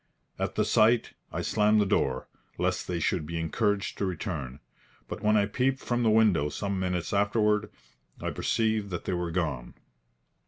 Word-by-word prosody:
At - - -2
the - - +2
sight, 115 +2 +3 0.2
I - - -3
slammed 105 0 +3
the 105 - +3
door, 65 -8 0 0.3
lest - - -1
they 90 -2 -2
should 85 +1 0
be 85 0 -3
encouraged 100 +4 -1
to 100 - +1
return. 80 - -4 0.5
But - - -6
when 105 0 +3
I 100 - +3
peeped 125 +6 0
from 120 -2 -1
the 115 - +3
window 105 -9 +4
some 100 +3 -3
minutes 90 -1 -2
afterward, 105 +1 +2 0.5
I - - -3
perceived 110 -3 0
that 85 -2 -5
they - - -1
were 90 -1 -2
gone. 75 -8 -3
100 Hz, 170 wpm, -28 LUFS, 85-110 Hz, 0.5 s, window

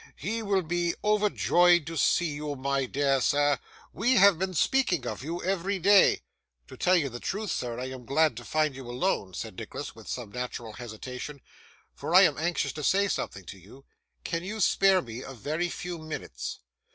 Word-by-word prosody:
'He 225 +4 -3
will 200 -3 +1
be 170 +1 -1
overjoyed 180 -5 +3
to 165 +1 -6
see 165 +1 +2
you, 145 0 -4
my 135 0 -1
dear 135 0 +1
sir. 145 +2 +2 0.3
We 245 +6 +2
have 200 -5 +6
been 190 -1 -2
speaking 250 - +2
of - - -4
you 170 +4 -4
every 195 +1 -1
day.' 200 +2 +5 0.4
'To - - -11
tell 185 +1 +3
you 160 -6 +2
the 120 -2 -7
truth, 205 - -3
sir, 120 -1 -3
I 130 +1 -4
am 130 -2 -9
glad 155 -1 +3
to 120 - -7
find 155 0 0
you 130 -2 -9
alone,' 120 - -1
said - - -6
Nicholas, - - -6
with - - -14
some 120 -5 -5
natural 120 -2 -5
hesitation; 125 +5 -7 0.5
'for - - -3
I - - +10
am - - +3
anxious 170 +1 -1
to 150 - -6
say 200 +6 +3
something 100 - -4
to 95 - -10
you. 125 +10 -16 0.4
Can 165 0 -3
you 215 +4 -5
spare 195 -1 +4
me 120 0 -7
a 135 - -8
very 155 +9 -2
few 175 0 -5
minutes? 155 -1 -6
155 Hz, 190 wpm, -28 LUFS, 130-185 Hz, 0.5 s, I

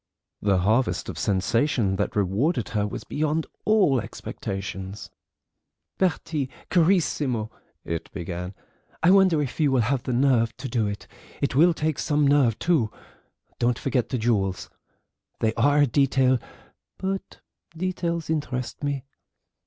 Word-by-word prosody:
The 100 -2 +3
harvest 110 +7 +1
of - - -6
sensation 105 +2 +1
that 100 - -1
rewarded 105 - +1
her 105 -2 0
was - - -6
beyond 155 +1 -1 0.2
all 190 - +4
expectations. 95 0 -6 0.9
"Bertie, 160 -6 0 0.2
carissimo," 155 - +2 0.3
it 85 -1 -4
began, 90 0 -5 0.5
"I 175 - +6
wonder 185 -6 +5
if 135 - -6
you 150 -3 +3
will 130 -2 +3
have 125 +3 0
the 125 - -3
nerve 120 -3 +2
to 135 - -5
do 115 -3 0
it: 100 0 -5 0.3
it 140 - 0
will 165 +5 +5
take 155 -2 -1
some 150 -1 +2
nerve, 140 -6 +4
too. 155 -11 +2 0.7
Don't 120 0 +2
forget 125 -4 -1
the 130 - -1
jewels. 105 -5 0 0.7
They 110 0 +1
are 145 +5 +3
a - - +6
detail, 130 -1 +3 0.6
but 195 0 -4 0.4
details 170 -2 -2
interest 145 -5 -3
me. 140 -2 -1
130 Hz, 135 wpm, -25 LUFS, 110-155 Hz, 0.9 s, I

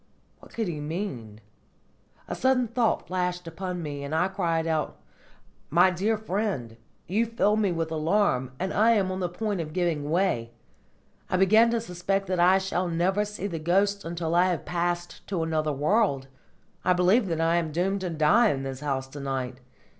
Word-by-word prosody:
What - - -17
could 225 -3 -1
he 160 -4 -4
mean? 145 - -5 0.9
A - - -4
sudden 260 -2 +2
thought 235 0 0
flashed 180 -1 -2
upon 180 +1 -5
me, 145 -2 -5
and 140 +3 -3
I 180 +4 +2
cried 170 -4 -1
aloud: 160 -2 -1 0.7
"My 175 +4 +5
dear 205 +5 0
friend, 195 - -3 0.3
you 220 +6 0
fill 215 -2 +2
me 210 -3 +1
with 165 -1 -2
alarm, 155 -5 +1
and 185 +2 -2
I 225 +3 +4
am 195 -4 +1
on 185 - -3
the 180 -2 -1
point 200 +1 -2
of 155 -1 -7
giving 165 -5 -1
way! 155 -10 0 0.8
I 185 - +1
begin 215 +5 +5
to 235 0 +1
suspect 195 -1 -2
that 185 -1 -1
I 180 +2 +6
shall 190 -1 -1
never 180 +4 +1
see 210 -2 -6
the 170 -5 -3
ghosts 200 +5 +1
until 165 0 -3
I 175 +1 +5
have 180 -3 -2
passed 175 0 -3
to 180 -4 -1
another 155 -1 0
world. 145 -1 +1 0.6
I 180 - +4
believe 185 +5 +3
that 165 -2 -2
I 165 +1 +2
am 165 -2 -1
doomed 190 +5 0
to 185 - -2
die 165 +9 +4
in 135 -5 -2
this 135 -1 -5
house 135 -2 -2
to 145 - -9
night! 130 -2 -3
175 Hz, 185 wpm, -26 LUFS, 160-195 Hz, 0.9 s, I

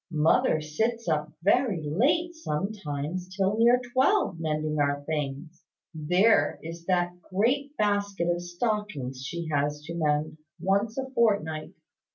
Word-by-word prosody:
Mother 160 +4 +3
sits 225 +10 -2
up 155 -1 0
very 205 -4 +2
late, 310 - +2
sometimes 180 - -4
till 195 +1 +2
near 240 +2 +6
twelve, 265 - +2
mending 155 -1 -1
our 145 0 +1
things. 150 +2 -4 0.3
There 165 +1 +3
is 165 +1 -8
that 180 -1 0
great 265 +11 0
basket 200 -4 0
of 175 0 0
stockings 175 - -3
she 170 +4 -4
has 145 +1 0
to 165 +2 -6
mend, 155 -1 0 0.2
once 200 +6 0
a 265 0 -2
fortnight! 200 -11 +1
175 Hz, 130 wpm, -27 LUFS, 155-215 Hz, 0.3 s, near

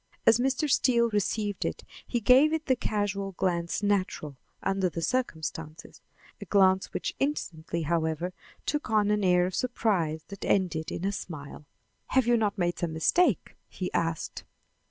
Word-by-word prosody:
As 225 - +6
Mr. 270 +4 +1
Steele 235 -3 +3
received 205 -1 -1
it - - -3 0.2
he 240 - 0
gave 260 +8 +5
it 320 0 -1
the 260 - +3
casual 200 -4 -2
glance 170 +1 -1
natural 185 -8 0 0.3
under 195 -1 +1
the 165 0 -5
circumstances, 160 -9 -3 0.4
a - - -6
glance 190 -1 +3
which - - -3
instantly, 170 - -2
however, 160 +2 -1 0.3
took 295 -4 -2
on 210 -1 +3
an 210 -1 +1
air 180 -1 +4
of 185 - -3
surprise 180 -10 0
that 200 -1 -8
ended 170 -5 0
in 180 - -3
a 200 - +1
smile. 150 -6 -7 0.4
"Have 260 -2 +2
you 240 0 +4
not 210 -2 0
made 175 -2 0
some 170 -2 -2
mistake?" 240 - +2
he 185 - -5
asked. 165 -2 -2
195 Hz, 155 wpm, -28 LUFS, 170-230 Hz, 0.4 s, As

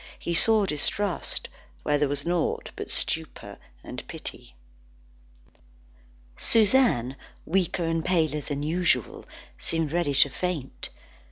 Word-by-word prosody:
He 170 - -3
saw 215 +4 +5
distrust 185 +4 -1 0.4
where 145 - +2
there 145 -1 +2
was 140 0 -2
naught 175 -1 -1
but - - -6
stupor - - -2 0.2
and - - -6
pity. - - -7 1.8
Suzanne 215 - +4 0.3
weaker 180 -1 0
and 165 0 0
paler 155 -4 +1
than 145 0 -4
usual, 170 +3 0 0.3
seemed 165 -2 -1
ready 170 -5 +1
to 140 - +6
faint. 165 -3 -4
165 Hz, 110 wpm, -26 LUFS, 145-180 Hz, 1.8 s, to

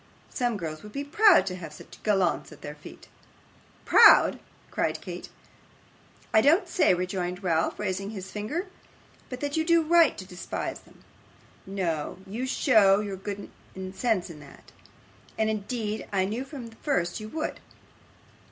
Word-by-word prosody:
Some 245 -4 -1
girls 155 -4 -5
would 210 0 -12
be 280 - -3
proud 385 +6 +5
to 185 - -3
have 165 -4 -8
such - - -14
gallants 195 -6 +1
at 155 - -14
their 145 - -7
feet.' 150 - -13 0.8
'Proud!' - - +7 0.3
cried - - -1
Kate. - - -8 1.0
'I 220 - +6
don't 320 - +4
say,' 330 - +3
rejoined 180 +1 -3
Ralph, 165 -3 +1
raising 195 -1 -3
his 195 -4 -6
forefinger, 215 - -4 0.6
'but 250 -1 -7
that 285 0 -2
you 320 - +2
do 335 0 +4
right 335 -1 +4
to 190 - -7
despise 180 -1 -5
them; - - -22 0.6
no, 175 -6 -2
you 230 +7 -4
show 215 -8 +4
your 205 -2 -4
good 200 +1 -7 0.4
sense 205 -5 0
in 155 - -11
that, 140 -1 -15 0.7
as 220 - +1
indeed 220 0 -3
I 190 -2 +1
knew 225 +7 -3
from 270 -3 -8
the 225 - -18
first 175 - -1
you 215 0 -7
would. 315 +6 -4
210 Hz, 155 wpm, -27 LUFS, 185-255 Hz, 1.0 s, Proud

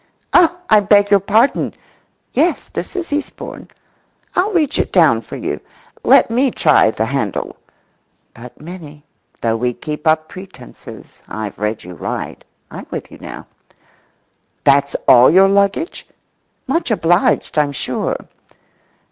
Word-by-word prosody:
"Oh, 345 0 +5
I 215 - +6
beg 205 0 +3
your 200 - +6
pardon! 215 +7 +1 0.6
Yes, 320 +5 0
this - - -6
is 345 -5 -4
Eastbourne. 295 +1 -5 0.7
I'll 390 +4 +1
reach 310 -7 +1
it - - -1
down - - +4
for - - -10
you. - - -4 0.4
Let - - +5
me 255 +4 +2
try 150 - +3
the 110 0 -2
handle." 115 -6 -3 0.8
[But, 120 +1 -13
Minnie, 155 -3 -11 0.4
though 115 -1 0
we 125 +1 -1
keep 150 +4 -6
up 155 0 +2
pretences, 185 - -13
I've 105 -3 -6
read 105 +1 -2
you 90 - -10
right—I'm - - -8
with - - -6
you - - -13 1.5
now]."That's 140 0 +3
all 125 0 +7
your 190 +3 +6
luggage?""Much 200 - -2
obliged, 175 -5 +1
I'm 145 -1 +1
sure." 140 - -2
175 Hz, 125 wpm, -17 LUFS, -, 1.5 s, all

